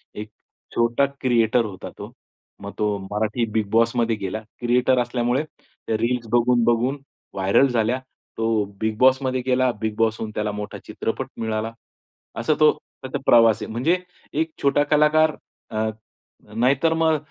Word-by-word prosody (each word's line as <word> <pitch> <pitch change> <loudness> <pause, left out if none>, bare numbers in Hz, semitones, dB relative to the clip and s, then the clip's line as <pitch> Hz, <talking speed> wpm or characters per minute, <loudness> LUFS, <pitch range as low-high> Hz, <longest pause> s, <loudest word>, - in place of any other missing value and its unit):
एक 105 0 -7 0.5
छोटा 120 +4 +3 0.2
क्रिएटर 120 -2 +2
होता 100 -3 -7
तो. - - -8 0.5
मग 100 0 -6
तो 105 -1 +1
मराठी 110 +3 -1
बिगबॉसमध्ये 115 +2 +1
गेला, 100 +2 -4 0.2
क्रिएटर 125 +1 +3
असल्यामुळे 120 +2 0
त्या 155 -6 -8
रील्स 120 +1 -1
बघून-बघून 120 +2 +2 0.4
व्हायरल 95 +8 +3
झाल्या. 120 0 0 0.4
तो 115 -1 +1 0.2
बिगबॉसमध्ये 130 +4 +2
गेला, 130 0 +3
बिगबॉस 110 0 0
होऊन 110 -1 -4
त्याला 105 0 -1
मोठा 105 0 -6
चित्रपट - - -3
मिळाला. 110 0 -2 0.7
असा 120 +7 +2
तो 155 -1 +7 0.3
त्याचा 130 +2 -4
प्रवास 115 -2 +5
आहे. - - -6
म्हणजे 135 +11 +1 0.4
एक 160 +2 -1
छोटा 140 +1 +3
कलाकार 150 +1 +3 0.4
अ, 110 0 0 0.7
नाहीतर 135 +7 +2
मग 160 -1 +2
120 Hz, 130 wpm, -23 LUFS, 110-130 Hz, 0.7 s, तो